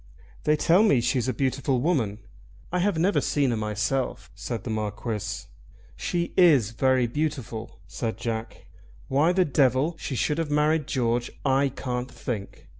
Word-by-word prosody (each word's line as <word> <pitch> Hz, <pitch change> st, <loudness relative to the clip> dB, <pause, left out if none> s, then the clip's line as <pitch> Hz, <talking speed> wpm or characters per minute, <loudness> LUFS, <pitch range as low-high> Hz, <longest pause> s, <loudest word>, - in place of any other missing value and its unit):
"They 150 Hz, -, +4 dB
tell 170 Hz, +5 st, +4 dB
me 205 Hz, -, +4 dB
she's 125 Hz, +1 st, 0 dB
a -, -, +2 dB
beautiful 130 Hz, -1 st, 0 dB
woman. 125 Hz, -, 0 dB, 0.5 s
I 180 Hz, -, 0 dB
have 190 Hz, -1 st, +1 dB
never 185 Hz, +5 st, +2 dB
seen 140 Hz, -3 st, +1 dB
her -, -, 0 dB
myself," 110 Hz, +4 st, -2 dB
said 115 Hz, -5 st, -5 dB
the 115 Hz, -, -4 dB
Marquis. 105 Hz, 0 st, -3 dB, 0.5 s
"She 170 Hz, -1 st, -2 dB
is 145 Hz, -, +5 dB
very 130 Hz, +1 st, +2 dB
beautiful," 125 Hz, -4 st, -3 dB
said 115 Hz, -2 st, -4 dB
Jack. 115 Hz, -1 st, -5 dB, 0.4 s
"Why 145 Hz, +6 st, +3 dB
the 185 Hz, 0 st, +3 dB
devil 140 Hz, +2 st, +2 dB
she 135 Hz, -, -4 dB
should 150 Hz, +5 st, 0 dB
have 165 Hz, -2 st, -1 dB
married 150 Hz, 0 st, +2 dB
George, 120 Hz, -3 st, 0 dB, 0.2 s
I 135 Hz, +1 st, +3 dB
can't 125 Hz, -1 st, -4 dB
think. 105 Hz, -6 st, -6 dB
130 Hz, 155 wpm, -26 LUFS, 115-150 Hz, 0.5 s, is